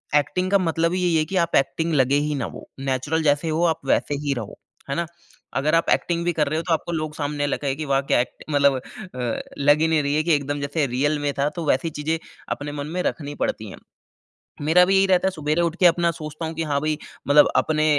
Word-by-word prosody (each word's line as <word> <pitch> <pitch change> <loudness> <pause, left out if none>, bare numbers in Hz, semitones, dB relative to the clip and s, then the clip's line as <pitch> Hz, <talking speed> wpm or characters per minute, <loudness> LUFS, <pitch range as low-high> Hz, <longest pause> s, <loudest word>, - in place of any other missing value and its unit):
Acting 180 +6 +1
का 200 - +6
मतलब 165 -1 0
ही 185 - 0
यही 175 -2 +2
है 155 - +3
कि - - -2
आप 170 -1 +1
एक्टिंग 160 +5 +1
लगे 135 -1 +3
ही 150 - -1
ना 130 -4 -2
वो। - - -10
नेचुरल 135 +4 -1
जैसे 150 +2 +2
हो 160 +2 0
आप 160 -1 +1
वैसे 145 +2 +1
ही 145 -1 0
रहो, 110 -3 -7 0.3
है 140 - -1
ना? 170 +2 -1 0.5
अगर 150 +4 +2
आप 165 - +2
एक्टिंग 170 -1 -1
भी 175 - +1
कर 150 -2 +1
रहे 155 +2 -1
हो - - -4
तो 170 - +3
आपको 165 +2 -2
लोग 155 -2 -3
सामने 145 -1 -2
लगे 140 -1 -1
कि 155 +1 -5
वाह 135 -1 +2
क्या - - +5
एक्ट 125 - -7
मतलब 140 -2 +3
अ, 125 - -5 0.2
लग 145 +1 +4
ही 160 - +4
नहीं 160 -2 +2
रही 140 +1 0
है 155 - +2
कि 170 0 +2
एकदम 145 0 -2
जैसे 140 0 -1
रियल 145 +3 +1
में 145 - +1
था 145 +2 +2
तो 165 - -3
वैसी 145 +5 +1
चीज़ें 160 +2 0 0.4
अपने 145 0 -6
मन 145 - -5
में - - +1
रखनी 145 -2 -8
पड़ती 110 -1 -4
हैं। - - -10 0.9
मेरा 165 +4 +5
भी 190 +2 +2
यही 195 0 +5
रहता 185 0 +3
है - - 0
सुवेरे 155 0 -1
उठ 170 -1 0
के 180 - +7
अपना 170 0 +4
सोचता 155 0 -6
हूँ 160 - -5
कि 165 - -2
हाँ, 145 -2 0
भई 155 0 -1 0.3
मतलब 145 +1 +7
अपने 155 -1 +2
155 Hz, 255 wpm, -23 LUFS, 145-165 Hz, 0.9 s, के